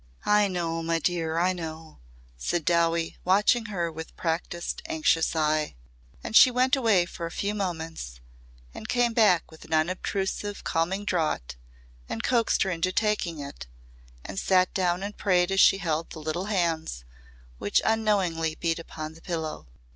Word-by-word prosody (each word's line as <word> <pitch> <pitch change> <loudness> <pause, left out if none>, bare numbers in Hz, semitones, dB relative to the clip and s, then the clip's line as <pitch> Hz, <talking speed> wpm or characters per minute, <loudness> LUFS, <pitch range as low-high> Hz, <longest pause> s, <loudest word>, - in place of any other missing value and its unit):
"I 210 0 +4
know, 170 -3 -2
my 165 0 0
dear, 165 -1 -1
I 180 +2 +2
know," 160 -2 -8 0.4
said 150 - -2
Dowie 170 -1 +1
watching 210 +5 +3
her 175 -6 -2
with 160 0 -8
practised, 170 +1 -3
anxious 315 - +1
eye. 155 -1 +1 0.5
And - - -5
she 255 - +9
went 255 +2 +3
away 220 -9 +3
for 170 -1 -6
a - - -9
few 200 +4 -2
moments 165 - -4 0.5
and - - -9
came 245 -1 +2
back 205 -9 +3
with 160 - -14
an 160 - -7
unobtrusive 190 +4 -1
calming 185 +5 -1
draught 155 - -1 0.5
and 115 - -4
coaxed 235 -3 +2
her 190 - -1
into 180 +1 0
taking 185 -7 0
it 140 - -8 0.6
and 95 - -4
sat 185 -1 +3
down 180 0 0
and 205 +1 -5
prayed 180 -2 +2
as 195 - +1
she 195 - +7
held 165 -4 -2
the 160 - -9
little 160 +4 -3
hands 165 - -1 0.5
which 100 - +2
unknowingly 190 -8 +1
beat 165 -1 -1
upon 155 -1 -7
the 165 - -16
pillow. 160 - -4
175 Hz, 160 wpm, -27 LUFS, 160-200 Hz, 0.6 s, she